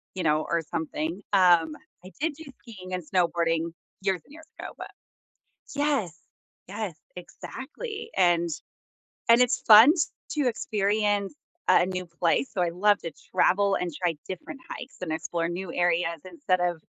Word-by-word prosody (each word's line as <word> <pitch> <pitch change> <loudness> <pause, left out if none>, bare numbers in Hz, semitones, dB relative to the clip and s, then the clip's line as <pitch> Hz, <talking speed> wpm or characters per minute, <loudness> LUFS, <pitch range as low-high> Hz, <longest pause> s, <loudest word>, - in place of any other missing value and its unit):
you 185 - -2
know, 155 0 +3
or 170 0 +1
something. 160 +3 -3
Um, 175 -5 +5 0.3
I 185 - -11
did 320 +1 0
do 320 - -11 0.2
skiing 185 -7 -10
and 180 -1 -2
snowboarding 170 -2 +1 0.3
years 190 -3 0
and - - -18
years 320 0 -14
ago, - - -5
but - - -8 0.9
yes, 275 - 0 0.5
yes, 205 -2 -4 0.2
exactly, 310 - -8
and 175 -2 +3 0.8
and 230 +1 +8
it's 250 -1 +3
fun 225 +7 +9 0.4
t 300 - -1
to 260 - +3
experience 205 -1 0 0.4
a - - +6
a - - +1
new 185 0 -4
place, 170 +8 0
so 190 - -1
I 175 - +2
love 205 +4 +3
to 165 - -4 0.2
travel 195 +2 +3
and 180 - -2
try 170 -3 +1
different 190 - -7
hikes 255 - -8
and 175 - -3
explore 165 +1 -2
new 175 +1 -5
areas 170 -1 +1
instead 185 +1 -1
of 175 -2 -1
185 Hz, 160 wpm, -27 LUFS, 170-210 Hz, 0.9 s, fun